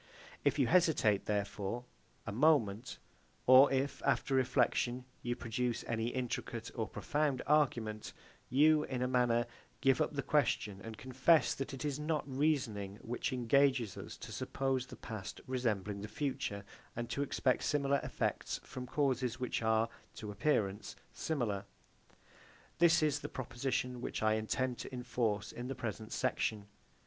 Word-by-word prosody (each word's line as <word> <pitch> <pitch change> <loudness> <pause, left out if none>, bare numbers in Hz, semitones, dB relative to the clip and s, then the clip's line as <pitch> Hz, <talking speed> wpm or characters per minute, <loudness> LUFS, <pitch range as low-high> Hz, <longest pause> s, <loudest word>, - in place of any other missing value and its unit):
If - - +2
you 135 - +4
hesitate, 150 - +3
therefore, 105 +2 -2 0.4
a 115 - -3
moment, 120 -4 +2 0.5
or 130 +2 +8
if, 135 +1 0
after 135 - +1
reflection, 125 -1 +2 0.2
you 120 0 -2
produce 120 +1 -2
any 115 0 -1
intricate 120 -2 -3
or 110 -3 -2
profound 150 -4 -1
argument, 120 -8 +1 0.4
you, 150 +3 +5
in 125 -1 -2
a - - +1
manner, 120 -2 +2 0.3
give 135 -2 +3
up - - 0
the 140 -1 -2
question, 105 -9 +1
and 115 -1 -7
confess 130 +5 +3
that 135 +1 -4
it 135 +2 -5
is 145 -1 -1
not 150 0 -1
reasoning 130 -9 0
which 120 +6 -2
engages 130 -3 +2
us - - -8
to - - -9
suppose 135 -2 -1
the - - -9
past 105 -2 -7
resembling 105 -6 -1
the 105 - -5
future, 120 -4 -3 0.3
and 120 0 -3
to 140 - -1
expect 130 -2 +1
similar 140 -1 +2
effects - - -2
from 125 0 -7
causes 130 -3 0
which 125 -2 -1
are, 110 0 +3 0.3
to 105 -2 -6
appearance, 105 -4 0 0.2
similar. 115 -11 -1 1.2
This 170 -1 +5
is 150 -1 +2
the - - -6
proposition 125 0 -2
which - - -3
I 110 0 +4
intended 120 +3 -1
to - - -7
enforce 115 -4 -1
in 120 +1 -6
the 135 - -4
present 110 -2 -5
section. 105 -2 -1
125 Hz, 150 wpm, -34 LUFS, 110-140 Hz, 1.2 s, or